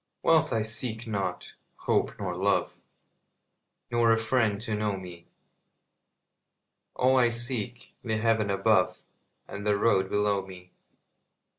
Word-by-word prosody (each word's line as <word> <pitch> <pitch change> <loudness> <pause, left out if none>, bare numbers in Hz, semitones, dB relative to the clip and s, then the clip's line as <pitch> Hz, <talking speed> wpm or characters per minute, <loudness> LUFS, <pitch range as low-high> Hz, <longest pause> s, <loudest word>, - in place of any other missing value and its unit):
Wealth - - +3
I 110 -1 +1
seek 110 +1 -2
not, 95 -5 -4 0.2
hope - - -1
nor - - -4
love, - - 0 1.2
Nor 120 -1 +3
a 115 - +4
friend 115 -3 +1
to 110 -1 -4
know 105 -2 -1
me; 90 -2 -11 1.7
All 130 +1 +3
I 120 -1 +4
seek, 120 0 -3
the 110 -2 -1
heaven 110 -1 +1
above 100 - +2 0.4
And 100 - -7
the 105 -1 +2
road 95 -3 +2
below 105 -1 +1
me. 90 -1 -13
110 Hz, 125 wpm, -27 LUFS, 100-115 Hz, 1.7 s, a